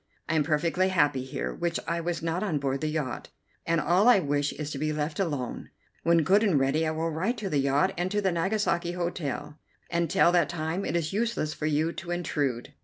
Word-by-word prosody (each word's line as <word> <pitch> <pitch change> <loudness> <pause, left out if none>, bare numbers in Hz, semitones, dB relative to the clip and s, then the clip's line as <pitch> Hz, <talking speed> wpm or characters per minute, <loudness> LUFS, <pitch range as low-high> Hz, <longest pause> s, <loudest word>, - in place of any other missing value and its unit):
I 160 - -1
am 160 - +3
perfectly 170 +5 +1
happy 145 -7 +2
here, 130 - -4
which 170 -1 -2
I 170 0 -1
was 170 0 -3
not 165 +2 -1
on 190 -8 0
board 135 -1 -1
the 155 - 0
yacht, 150 -5 -3 0.4
and 165 0 +2
all 185 +7 +3
I 245 - +7
wish 145 -4 0
is 150 -1 -5
to 140 - -4
be 155 +1 0
left 150 +4 -3
alone. 145 -10 -3 0.3
When 170 -1 +3
good 195 +6 +4
and 185 -10 +3
ready 145 +4 +1
I - - +1
will 160 +1 -1
write 190 +11 -1
to 200 -4 -4
the 145 - +2
yacht 140 +7 +2
and 180 +1 0
to 205 - 0
the 195 -2 +1
Nagasaki 175 -1 0
Hotel. 170 -4 -4 0.3
Until 170 0 +3
that 170 -5 +3
time 170 +3 -2
it 165 - -2
is 165 -1 -1
useless 215 -8 -1
for 155 - -3
you 155 +2 +1
to 175 - -8
intrude." 145 -7 -2
165 Hz, 220 wpm, -27 LUFS, 150-175 Hz, 0.4 s, I